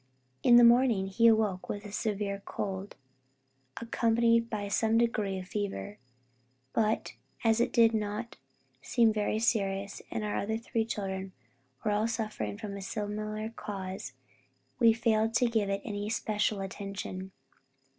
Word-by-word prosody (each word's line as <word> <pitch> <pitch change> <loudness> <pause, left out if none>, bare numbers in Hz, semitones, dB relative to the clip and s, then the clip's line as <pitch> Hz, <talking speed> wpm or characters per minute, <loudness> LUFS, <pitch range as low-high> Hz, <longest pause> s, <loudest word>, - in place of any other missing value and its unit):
In 240 - +6
the 240 - +9
morning 235 -4 +5
he 195 +4 +3
awoke 215 -5 +2
with 205 0 -4
a 205 - -8
severe 205 -2 -2
cold, 195 0 -4 0.8
accompanied 230 0 +2
by 205 -2 -3
some 220 +2 +2
degree 215 -4 +1
of 185 -1 -7
fever; 205 0 -4 0.7
but 220 -1 0 0.3
as 225 0 +3
it - - +1
did 230 -1 +5
not 215 +2 -3 0.4
seem 230 -3 +3
very 215 0 0
serious, 200 -3 0
and 220 - -3
our 210 -1 -1
three 230 0 -1
children 190 -3 -4 0.5
were 210 - +2
all 210 +2 +2
suffering 220 -3 -3
from 205 -2 -6
a 200 - -6
similar 215 +2 -4
cause, 190 -4 -6 0.7
we 230 -2 +7
failed 225 0 +1
to 245 - +4
give 220 -4 +1
it 195 0 -2
any 205 -2 -3
especial 210 -2 0
attention. 195 -1 -6
215 Hz, 140 wpm, -30 LUFS, 200-230 Hz, 0.8 s, the